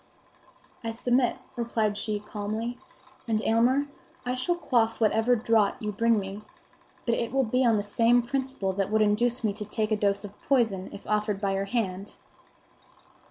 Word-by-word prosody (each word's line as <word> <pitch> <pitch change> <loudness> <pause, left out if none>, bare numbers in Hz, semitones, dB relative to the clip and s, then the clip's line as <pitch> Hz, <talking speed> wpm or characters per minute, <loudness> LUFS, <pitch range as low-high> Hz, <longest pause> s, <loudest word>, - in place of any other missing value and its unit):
"I 230 - -2
submit," 245 +2 +1 0.2
replied 225 -3 0
she 210 0 -2
calmly. 215 +4 -4 0.5
"And, 220 -2 +1
Aylmer, 245 +5 +3 0.4
I 250 - 0
shall 255 +8 0
quaff 240 -9 +1
whatever 225 +2 +3
draught 225 -1 +2
you 210 -3 -3
bring 230 +2 +2
me; 195 +1 -6 0.6
but 235 - +2
it 230 0 -1
will 270 +1 +2
be 250 +2 +1
on 230 -3 +4
the 205 - -1
same 230 +4 +3
principle 265 -6 -2
that 195 0 -1
would 215 0 +3
induce 235 +4 +1
me 210 -2 +1
to 210 +1 -6
take 215 +1 -2
a - - +4
dose 200 -1 0
of 205 0 -11
poison 225 -9 +1
if - - -10
offered 210 -1 0
by 195 -1 0
your 195 0 -1
hand." 200 -3 -3
220 Hz, 170 wpm, -27 LUFS, 205-240 Hz, 0.6 s, on